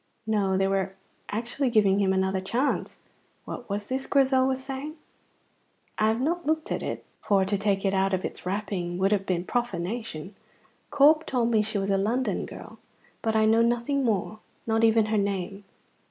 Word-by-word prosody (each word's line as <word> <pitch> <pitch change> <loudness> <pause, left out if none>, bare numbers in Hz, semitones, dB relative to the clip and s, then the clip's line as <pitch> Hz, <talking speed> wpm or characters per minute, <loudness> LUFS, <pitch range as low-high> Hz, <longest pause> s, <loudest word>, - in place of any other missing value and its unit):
No, 200 -3 +1
they 195 0 +2
were 195 0 -1 0.3
actually 240 +5 -1
giving 205 -4 +3
him 195 -1 +2
another 190 0 +1
chance. 235 +9 -1 0.4
What 240 - -7
was 205 +1 -2
this 260 +4 -3
Grizel 265 -2 +3
was 265 0 -1
saying? 275 +3 -5 1.0
"I 215 - +4
have 220 +1 +1
not 340 +6 0
looked 315 +1 -1
at - - -1
it, - - -5
for 195 -2 +2
to 200 +2 0
take 200 0 0
it 195 - +2
out 195 0 +2
of 185 0 -1
its - - -5
wrapping 185 -2 -3
would 190 +2 +2
have 195 -2 +1
been 175 -2 0
profanation. 210 -4 -3 0.6
Corp 300 +2 +5
told 240 -3 +1
me 220 -2 +4
she 215 0 -2
was 195 0 -1
a 195 - +3
London 230 +7 0
girl; - - -11 0.4
but 220 -1 0
I 220 0 +4
know 225 +1 +4
nothing 240 +4 +1
more, 215 -2 -1 0.3
not 225 0 +1
even 225 -1 +5
her 215 0 +1
name. 200 0 -3
215 Hz, 185 wpm, -26 LUFS, 195-245 Hz, 1.0 s, Corp